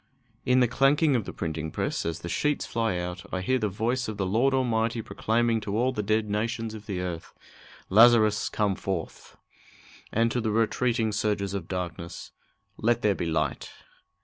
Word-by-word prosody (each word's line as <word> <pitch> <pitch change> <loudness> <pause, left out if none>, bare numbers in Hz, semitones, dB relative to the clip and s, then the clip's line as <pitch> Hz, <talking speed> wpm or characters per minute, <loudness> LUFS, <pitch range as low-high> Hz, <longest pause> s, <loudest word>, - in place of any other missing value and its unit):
In 125 0 +4
the 125 - +5
clanking 140 +4 +3
of 115 -5 0
the - - -5
printing 80 -1 -4
press, 80 - -2
as 85 0 -4
the - - -6
sheets 150 - 0
fly 115 -5 -1
out, 90 +1 -4
I 95 - -2
hear 130 +7 +1
the 105 -3 0
voice 120 +6 -1
of 110 -1 -5
the 95 - -1
Lord 115 +8 +2
Almighty 115 -3 +1
proclaiming 115 +1 0
to 105 0 -3
all 125 +3 +2
the 105 - -2
dead 110 +1 +1
nations 110 +2 -2
of 110 -1 -10
the 95 -4 -3
earth, 90 -2 -6 0.5
"Lazarus, 110 0 +5
come 105 -2 +1
forth!" 95 -3 -5 0.7
And 115 +1 +2
to 125 - 0
the 110 - -1
retreating 115 +1 +1
surges 100 -1 -1
of 95 -4 -4
darkness, 85 -2 -5 0.5
"Let 120 +1 +1
there 105 - +4
be 85 - -3
light!" 80 -2 -1
110 Hz, 180 wpm, -27 LUFS, 95-120 Hz, 0.7 s, the